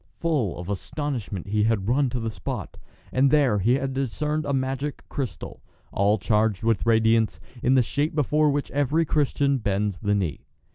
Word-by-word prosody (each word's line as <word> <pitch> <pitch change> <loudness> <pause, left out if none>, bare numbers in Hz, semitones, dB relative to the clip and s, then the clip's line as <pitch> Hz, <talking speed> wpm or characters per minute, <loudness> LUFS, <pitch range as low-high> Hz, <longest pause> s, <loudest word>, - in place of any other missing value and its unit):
Full 145 - 0
of 90 - -7
astonishment 105 - -4
he 105 +1 +1
had 110 -4 0
run 135 +3 +2
to 125 - -3
the 115 -1 -3
spot, 95 -5 -5 0.4
and 135 +2 +3
there 135 -8 +3
he 115 +6 +3
had 135 0 -2
discerned 150 +4 -2
a - - 0
magic 135 +2 -2
crystal, 130 - -5 0.3
all 100 +2 +2
charged 105 0 +1
with 115 -1 +1
radiance, 115 0 +3 0.2
in 130 - +3
the 130 - +5
shape 145 +6 -1
before 150 +1 +2
which 145 0 -1
every 145 +4 +1
Christian 140 -2 +1
bends 100 -3 -1
the 105 -1 +1
knee. 90 -7 -3
125 Hz, 175 wpm, -25 LUFS, 105-145 Hz, 0.4 s, the